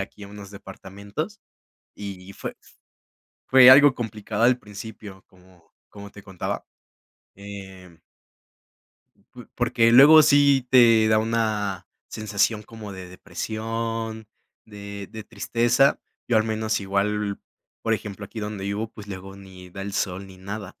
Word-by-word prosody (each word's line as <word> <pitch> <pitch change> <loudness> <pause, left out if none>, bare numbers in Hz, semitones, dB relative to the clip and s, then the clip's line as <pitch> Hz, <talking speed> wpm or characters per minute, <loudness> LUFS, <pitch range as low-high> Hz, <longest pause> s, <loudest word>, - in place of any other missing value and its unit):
aquí 100 +1 -8
a - - -11
unos 100 -1 -11
departamentos, 100 - -8 0.5
y 100 -2 -9
fue - - -6
f - - -22 0.7
fue 130 -1 +8
algo 145 +1 +8
complicado 110 -2 -3
al 125 +1 +4
principio, 105 -2 -11
como 90 -2 -24 0.2
como 100 0 -11
te 100 - -14
contaba, 95 -3 -5 0.7
em 95 -3 -11 1.4
p - - -12
porque 115 0 +2
luego 150 +5 +9
sí 140 -3 +4
te 115 -4 +6
da 110 0 +4
una 110 -4 -1 0.2
sensación 105 0 -1
como 110 -2 -10
de 95 -1 -9
depresión, 115 +3 -5 0.4
de 100 -1 -9
de 110 -1 -9
tristeza. 120 +5 +1 0.3
Yo, 120 - +2
al 110 - +3
menos, 110 -1 -1
igual, 100 +1 -1 0.4
por 115 - 0
ejemplo, 105 -1 -7
aquí 110 - -10
donde 105 -2 -5
vivo, 105 +3 -3
pues, 105 -2 -12
luego 95 0 -8
ni 95 -2 -13
da 95 - -9
el 100 0 -6
sol 95 -1 -3
ni 95 -1 -14
nada. 100 0 -7
105 Hz, 140 wpm, -24 LUFS, 100-115 Hz, 1.4 s, luego